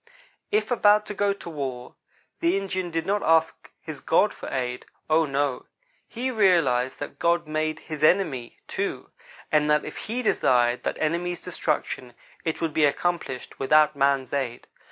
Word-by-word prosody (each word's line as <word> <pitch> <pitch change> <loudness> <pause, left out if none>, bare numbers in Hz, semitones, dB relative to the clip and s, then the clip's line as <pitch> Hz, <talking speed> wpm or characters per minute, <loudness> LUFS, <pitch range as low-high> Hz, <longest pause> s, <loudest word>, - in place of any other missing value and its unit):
If 425 -9 0
about 210 -3 +4
to - - -5
go 205 0 +1
to 200 - -7
war, 135 -6 -5 0.5
the 170 +3 +2
Indian 185 -2 -3
did 165 -1 -2
not 205 +1 0
ask 160 0 +2
his - - -7
God - - +2
for - - -8
aid 125 -1 -3 0.2
oh, 160 +1 +4
no. 140 -1 -1 0.4
He 255 +3 -3
realized 165 - +3
that 145 - -7
God 170 -1 +1
made 155 0 -2
his 155 -2 -6
enemy, 155 -8 +2
too; - - -4 0.4
and 150 -1 +3
that 150 0 +3
if - - -7
He 245 +3 -3
desired 120 - +2
that - - -1
enemy's 175 +3 -1
destruction, 150 -7 -3 0.3
it 160 - -2
would 165 -2 -1
be 155 0 +4
accomplished 145 -3 -2
without 150 +2 +4
man's 140 -2 +1
aid. 130 -4 -2
155 Hz, 160 wpm, -25 LUFS, 135-180 Hz, 0.5 s, about